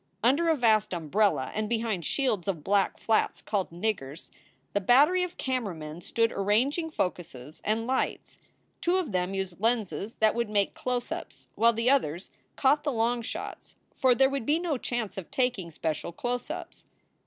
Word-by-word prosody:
Under 285 +8 +4
a 320 - +4
vast 215 -4 +3
umbrella, 170 -2 +1
and 215 0 -2
behind 225 -8 -1
shields 235 -10 0
of 170 -6 -2
black 200 +2 +2
flats 225 - +1
called 200 -3 -2
"niggers, 170 -5 -4 0.2
" - - -40
the 205 - +1
battery 285 - +5
of 360 -1 -3
camera 250 -8 -2
men 155 +1 -8
stood 230 +5 +1
arranging 250 - +1
focuses 155 - -4
and 220 +2 0
lights. 260 +2 -2 0.4
Two 350 +2 +2
of 345 -10 -2
them 185 +1 -1
used 190 -1 -4
lenses 225 -2 0
that 220 0 +3
would 235 -2 -1
make 205 -2 +1
close 250 -1 -3
ups, - - -7
while 230 +1 +4
the 230 +3 +2
others 180 - 0 0.2
caught 290 +2 +3
the 295 - 0
long 235 0 +1
shots, 225 - -7 0.2
for 255 -2 +3
there 265 +3 +5
would 275 -4 -3
be 300 +2 +4
no 340 -3 -1
chance 235 -6 -3
of 180 - -10
taking 250 - 0
special 160 +1 -3
close 245 +7 -3
ups. - - -7
225 Hz, 175 wpm, -28 LUFS, 190-255 Hz, 0.4 s, battery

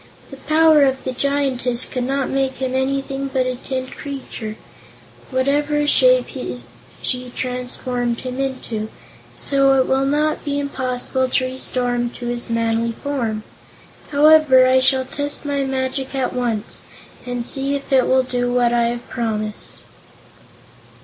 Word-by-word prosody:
"The 275 - -9
power 310 +2 +4
of 265 -1 +1
the 260 - -2
Giantess 255 -2 0
could 250 -1 -3
not 270 0 0
make 270 -1 0
him 260 -1 -3
anything 275 +1 -1
but 260 -1 +1
a 255 0 -1
tin 260 +1 -4
creature, 260 -5 -7 0.7
whatever 290 +3 +1
shape - - +4 0.8
she 250 -1 -2
transformed 250 -1 -2
him 255 0 -5
into, 250 -5 -3 0.5
so 275 -1 +3
it 260 - +3
will 270 +1 +2
not 300 +2 +1
be 285 -1 -1
impossible 260 -2 -1
to 255 - +2
restore 255 -1 -1
him 240 0 0
to 245 - -7
his 240 0 -3
manly 230 0 0
form. 230 -5 -3 0.7
Anyhow, 295 -3 +6
I 260 0 +5
shall 260 0 +3
test 285 +3 -3
my 285 -1 0
magic 265 0 -2
at 260 -2 -1
once, 235 -4 -2 0.5
and 245 -1 -3
see 275 +2 0
if 280 0 -4
it 260 -2 +5
will 260 0 +4
do 245 -1 -1
what 245 -1 +2
I 235 -1 +3
have 240 +1 -3
promised." 215 -3 -3
260 Hz, 145 wpm, -20 LUFS, 245-275 Hz, 0.8 s, Anyhow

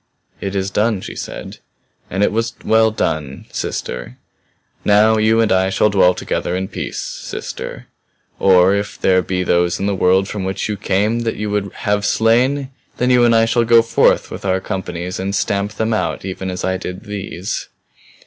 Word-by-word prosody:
"It 100 0 -4
is 95 0 -1
done," 105 -2 +1
she - - -7
said. - - -7 0.5
"And 95 +2 0
it - - +3
was 115 +2 -1
well 110 0 +4
done 80 -10 -3
sister. 60 -1 -4 0.7
Now 110 +2 +4
you 110 +1 +3
and 115 -1 +1
I 95 0 +3
shall 105 +2 +2
dwell 90 -2 +4
together 90 - -2
in 95 +1 -3
peace - - -5
sister. - - -6 0.5
Or 95 0 +5
if 100 0 -3
there 95 -1 +3
be 90 0 -2
those 85 -1 +1
in 100 - -1
the 100 - +1
world 95 +1 +3
from 105 -2 -4
which 95 +1 -2
you 105 - -2
came 105 +3 0
that 115 -1 -2
you 105 0 -3
would 100 -1 -1
have 105 0 +1
slain, 125 +6 +2 0.3
then 125 +1 +2
you 125 -1 +5
and 115 -1 +5
I 115 0 +5
shall 115 +1 +2
go 115 0 +5
forth 115 - +2
with - - -7
our 95 -1 +1
companies 90 -1 -4
and 100 +1 -2
stamp 100 +1 -1
them 110 +1 -1
out 110 - -2
even 95 0 -4
as 90 -1 -4
I 95 0 0
did 90 +1 -7
these." 100 -2 -5
100 Hz, 185 wpm, -18 LUFS, 95-110 Hz, 0.7 s, Or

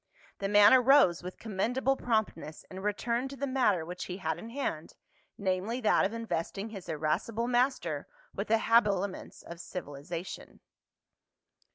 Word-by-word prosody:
The 195 - -2
man 205 +2 +7
arose 260 - +5
with 180 +1 -8
commendable 235 +6 0
promptness 215 - -2
and 190 +1 -7
returned 235 +5 -1
to 275 - -8
the 280 - -3
matter 245 -11 +1
which 180 +2 -6
he 180 - -5
had 160 -3 -2
in 225 - -8
hand, 230 - -4 0.4
namely 195 +5 -1
that 215 - +3
of 195 - -1
investing 215 -2 -3
his 195 -6 -9
irascible 160 +10 -1
master 240 - 0 0.3
with 200 - -4
the 225 - +4
habiliments 205 -4 +1
of 170 0 -10
civilization. 170 0 -7
205 Hz, 145 wpm, -30 LUFS, 175-235 Hz, 0.4 s, man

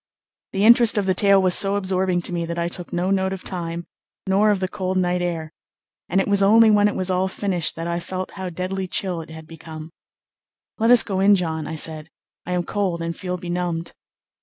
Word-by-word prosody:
The 195 +2 +1
interest 235 -1 +6
of 205 - +1
the 190 - +2
tale 200 +1 +4
was 185 -1 +3
so 195 +1 +5
absorbing 185 -2 -1
to 180 - -1
me 170 -1 -2
that 170 0 -5
I 170 0 -1
took 175 0 -6
no 180 +2 -1
note 190 -1 0
of 190 - -8
time, 170 -2 -5 0.4
nor 200 +2 +2
of 205 -2 +1
the 185 - -1
cold 185 -1 -3
night 180 -1 0
air, 165 -3 -4 0.6
and 190 - +2
it 195 - 0
was 200 -1 +2
only 220 +3 +6
when 205 0 +4
it 205 - -2
was 185 0 -1
all 185 +1 +1
finished 190 -3 -2
that 165 - -5
I 170 0 -2
felt 185 +1 -6
how 190 -2 -6
deadly 185 +2 -4
chill 180 -2 -2
it 160 - -12
had 160 0 -10
become. 160 0 -10 0.9
"Let 225 +1 +2
us 245 -1 +7
go 195 -3 -3
in, 200 +1 +5
John," 160 -4 -3
I 160 - -5
said; 155 0 -3 0.4
"I 180 - -2
am 180 -1 0
cold 180 -4 -2
and 165 0 -4
feel 180 -2 -4
benumbed." 175 -1 -4
185 Hz, 225 wpm, -22 LUFS, 170-195 Hz, 0.9 s, us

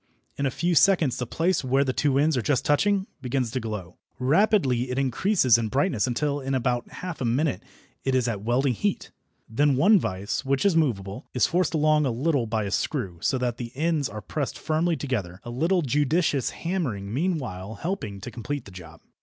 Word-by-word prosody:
In 140 - 0
a - - +1
few 175 +7 -1
seconds 165 -5 +4
the 125 - -3
place 170 +7 0
where 135 +2 +2
the 130 -2 -1
two 140 -1 +1
ends 150 +2 +3
are 125 - +1
just 135 +3 0
touching 195 +6 +2 0.2
begins 125 -2 -1
to 130 - -1
glow. 105 -6 -6 0.2
Rapidly 135 - +2
it 125 - -3
increases 135 - +3
in 115 - -1
brightness 130 - +1
until 145 +4 -1
in 135 0 -2
about 125 -1 -1
half 180 -5 -7
a - - 0
minute 130 - 0 0.4
it 135 -1 +1
is 125 -2 +2
at 105 -4 -2
welding 125 +4 +1
heat. 200 - -2 0.4
Then 140 +5 +2
one 195 +10 +5
vice, 95 - -3
which 135 +3 0
is 195 -4 +4
movable, 105 -11 -1
is 125 - +4
forced 175 -2 0
along 155 -1 +3
a - - +1
little 130 +1 0
by 110 -1 -1
a 100 - -4
screw, 100 - -2
so 135 - +1
that 125 -2 -2
the 120 -1 -6
ends 155 -1 0
are 105 +1 -7
pressed 140 +7 -4
firmly 160 +2 0
together, 105 - -3
a 120 - -7
little 170 +8 +1
judicious 145 0 +1
hammering 130 - -3
meanwhile 125 - -2
helping 110 - -4
to 120 - -7
complete 140 +5 -5
the 100 - -12
job. 85 -3 -12
135 Hz, 200 wpm, -25 LUFS, 115-155 Hz, 0.4 s, one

